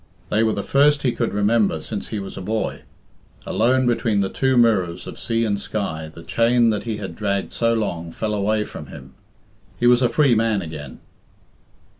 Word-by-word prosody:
They 110 - +2
were 110 -1 +2
the 100 - -3
first 145 +1 +3
he 125 - +2
could 115 -1 -2
remember 105 -4 +2
since 105 +6 -6
he 110 - -4
was 95 -1 -6
a - - -6
boy. 110 +3 -2 0.6
Alone 130 +3 +2
between 115 -4 +1
the 95 - 0
two 130 +3 +1
mirrors 95 -7 +2
of - - -8
sea 115 0 0
and 100 -2 -1
sky, 80 -8 -3
the 85 - -12
chain 115 +5 +3
that 105 +1 -3
he 110 -2 -3
had 100 -2 -6
dragged 100 -2 -2
so 115 0 +1
long 85 -7 -3
fell: 105 +5 -3
away 105 +1 +1
from - - -9
him. 65 0 -12 0.6
He 120 - -1
was 120 +1 +5
a 125 - +3
free 145 -5 +3
man 110 -3 +1
again. 75 -5 -8
110 Hz, 195 wpm, -22 LUFS, 100-115 Hz, 0.6 s, was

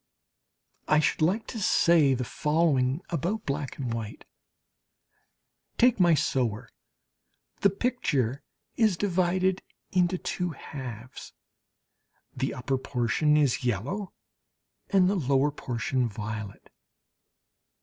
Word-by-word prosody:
I 155 - +4
should 155 - 0
like 190 +8 +2
to 230 - -6
say 160 -7 +4
the 125 - -2
following 150 0 +1
about 175 +7 -2
black 140 -1 -3
and 125 -4 -3
white: 110 -2 -6 1.5
take 245 -2 +4
my 175 -3 +5
"Sower"! 120 -5 -1 0.9
The 200 - +4
picture 170 - -1 0.4
is 215 -6 +3
divided 185 0 +1 0.3
into 180 0 +2
two 180 -1 -3
halves, 125 -4 -9 1.0
the - - -1
upper 130 +1 -2
portion 130 +4 +1
is 145 -2 +2
yellow 130 - -2 0.8
and 190 -3 +4
the 195 - +2
lower 140 -4 +2
portion 125 -2 -2
violet. 105 -1 -7
150 Hz, 105 wpm, -27 LUFS, 125-180 Hz, 1.5 s, my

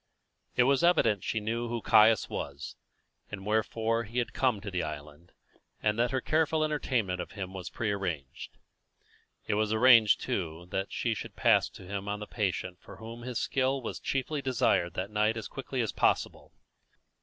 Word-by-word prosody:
It 125 - +5
was 135 +4 +3
evident 115 - +3
she 110 - -1
knew 115 +3 -2
who 120 0 -2
Caius 110 0 +5
was, 70 0 -6 0.5
and 95 -2 -7
wherefore 110 +2 0
he 115 +3 -8
had 120 -1 -1
come 125 -6 +1
to 100 0 -7
the 90 -1 -1
island, 75 +2 -8 0.5
and 105 +1 0
that 120 +1 +3
her 130 0 -1
careful 155 +1 +1
entertainment 125 -11 -1
of - - -8
him 95 -3 -6
was 95 -1 -6
prearranged. 95 - -4 0.9
It - - -1
was 105 +1 +1
arranged, 115 -1 +6
too, 85 -2 -3
that 95 +1 -2
she 115 - -1
should - - -7
pass - - +3
him 100 +2 -6
on 105 0 -2
to 105 - -6
the - - -30
patient 95 -3 -2
for - - -12
whom 115 +1 -9
his 125 -1 -4
skill 135 +1 0
was 120 - -5
chiefly 140 +2 -2
desired 120 -9 +1
that 95 +3 -3
night 105 +2 +1
as 110 - -5
quickly 135 -1 -4
as 115 - -1
possible. - - 0
110 Hz, 180 wpm, -29 LUFS, 95-125 Hz, 0.9 s, arranged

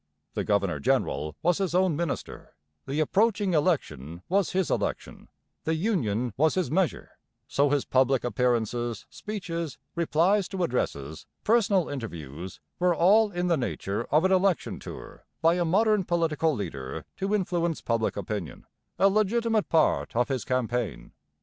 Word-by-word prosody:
The - - -2
governor 100 -7 +1
general 75 +2 0
was 175 +1 +2
his 185 -3 -1
own 185 -3 +3
minister, 170 -1 -4 0.3
the 140 +3 -2
approaching 200 +4 +2
election 90 - -1
was 195 0 +2
his 190 -1 0
election, - - -3 0.4
the 160 - 0
Union 125 - 0
was 155 +3 +3
his 185 -5 0
measure; 180 0 -1 0.3
so 145 0 +2
his 145 -1 +1
public 130 0 +2
appearances, 120 -2 0
speeches, 170 -7 -5 0.2
replies 175 +4 +2
to 190 -2 -3
addresses, 80 - -3 0.2
personal 205 -6 +3
interviews 90 - -7 0.2
were 180 -1 +3
all 205 +6 +5
in 175 -1 -2
the 170 -2 +2
nature 115 -4 -3
of 155 +5 +2
an 190 - +3
election 190 -2 +1
tour - - -10 0.2
by 165 0 +4
a 175 0 0
modern 210 +4 +3
political 165 -2 +1
leader 80 - -5
to 195 +2 0
influence 175 -4 0
public 115 -3 -1
opinion, 100 -6 -5 0.3
a 195 - +5
legitimate 215 +2 +1
part 160 -7 +2
of 120 0 +2
his 130 -4 -1
campaign. 125 -3 -2
160 Hz, 145 wpm, -27 LUFS, 120-185 Hz, 0.4 s, all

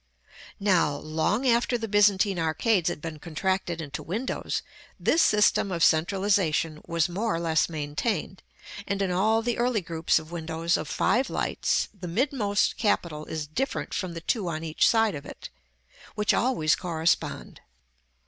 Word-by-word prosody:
§ - - -44
VIII. 60 +1 -21
Now, 175 -7 +3
long 160 - -1
after 240 +1 +2
the 225 -1 -4
Byzantine 205 -2 +3
arcades 175 +4 +1
had 175 -4 -6
been 160 -2 -6
contracted 175 +2 -2
into 145 -4 -5
windows, 220 - -3 0.4
this 325 - +3
system 210 -3 +3
of 170 -2 0
centralization 165 -2 +2
was 165 -2 +1
more 200 +4 -1
or - - -2
less 165 -1 +1
maintained; 160 +6 -3 0.5
and 200 -1 -1
in 190 - -1
all 220 +5 +2
the 240 0 -1
early 240 -3 +1
groups 165 -1 0
of 160 +1 -5
windows 165 0 -1
of - - -3
five 260 +3 +1
lights - - 0
the 190 -3 -8
midmost 210 0 0
capital 170 -8 0
is 155 -1 -4
different 255 - -3
from 185 -4 -3
the 165 - -6
two 200 +2 -1
on 155 -1 -4
each 160 -1 +2
side 225 -3 +3
of 140 - -6
it, - - -10 0.6
which 210 -1 +2
always 230 -12 +2
correspond. 170 -2 -2
180 Hz, 160 wpm, -26 LUFS, 160-210 Hz, 0.6 s, Now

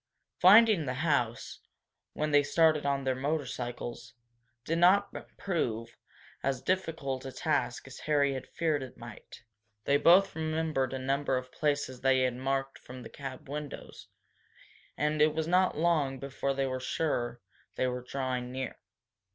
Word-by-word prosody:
Finding 205 -4 +7
the 125 - -2
house, 120 -7 -1 0.5
when 155 0 -2
they 145 0 +6
started 150 0 +3
on 140 -1 0
their 130 -1 +1
motorcycles, 130 -4 -4 0.5
did 165 +1 0
not 190 +4 +4 0.2
prove 115 - -2 0.5
as 135 -2 -2
difficult 160 -7 -2
a 135 - -6
task 130 -2 -1
as 135 -1 -11
Harry 145 -2 +2
had 130 -1 -6
feared 155 -4 -1
it 130 -1 -9
might. 120 -1 -12 0.4
They 140 +4 +3
both 180 +5 +5
remembered 155 -4 -1
a - - -2
number 135 +1 0
of 130 0 -6
places 145 -4 -1
they 130 0 +3
had 125 -1 +1
marked 135 +1 -2
from 125 0 -10
the - - -9
cab 135 -2 -8
windows, 145 +1 -7 0.9
and 150 +1 0
it 155 0 +4
was 160 0 -1
not 180 -1 +2
long 155 -5 +1
before 135 +1 -3
they 135 0 0
were 130 -1 -2
sure 120 -4 -2 0.4
they - - 0
were 125 0 -2
drawing 125 -1 -3
near. 130 0 -5
140 Hz, 150 wpm, -30 LUFS, 130-155 Hz, 0.9 s, Finding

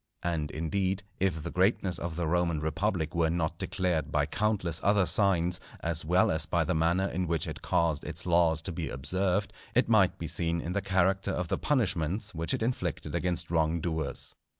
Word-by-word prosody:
And, 80 -4 -1
indeed, 95 +5 -1 0.2
if 90 -5 0
the - - -5
greatness 95 -1 +1
of 85 -2 -4
the 85 0 -1
Roman 85 -1 +1
Republic 80 +2 -1
were 85 -2 +2
not 80 -1 -1
declared 80 -5 -1
by 75 -2 +2
countless 90 -2 -1
other 100 -1 +4
signs, 90 -3 +3 0.2
as 80 -1 -1
well 90 +4 +3
as 80 -1 -1
by 85 -1 +1
the 90 +3 0
manner 85 +4 +2
in 90 -2 -2
which 80 -2 0
it - - -6
caused 80 -3 +1
its - - -3
laws 85 -2 +3
to 95 - -4
be 80 - -4
observed, 95 +8 -1 0.2
it - - +4
might - - +4
be - - -5
seen 85 0 0
in 85 - -4
the 100 - 0
character 95 0 +1
of 90 -3 -2
the 95 - -1
punishments 100 - 0
which 85 0 -2
it - - 0
inflicted 125 +2 -2
against 85 0 -2
wrong 80 0 +2
doers. 80 -4 -2
85 Hz, 195 wpm, -29 LUFS, 80-95 Hz, 0.2 s, other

